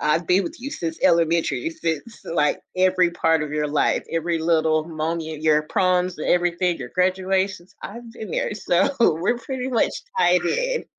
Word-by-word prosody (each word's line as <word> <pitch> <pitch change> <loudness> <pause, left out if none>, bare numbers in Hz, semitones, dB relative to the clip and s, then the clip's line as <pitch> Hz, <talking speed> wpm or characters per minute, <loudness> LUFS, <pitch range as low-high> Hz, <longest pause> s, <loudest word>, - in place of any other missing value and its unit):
I've 160 +2 +1
been 185 +2 +3
with 180 - -7
you 280 +3 -5
since 165 -1 -4
elementary, 170 - +2
since 215 - -4
like 150 -3 0 0.2
every 185 -1 +3
part 165 -2 +2
of 150 -1 -5
your 150 -1 -1
life. 145 - +1
Every 165 0 -1
little 160 -1 +2
moment: 160 -1 -4
your 155 -1 +3
proms 180 +1 0
and - - -3
everything, 175 0 +1
your 125 -2 -7
graduations, 185 0 0
I've 235 +2 -8
been 215 -4 -8
there. - - -1
So, 185 +1 +1
we're 200 +3 +2
pretty 260 +1 -4
much 240 -3 +1 0.3
tied 175 0 +4
in." - - -1
175 Hz, 170 wpm, -22 LUFS, 160-190 Hz, 0.3 s, tied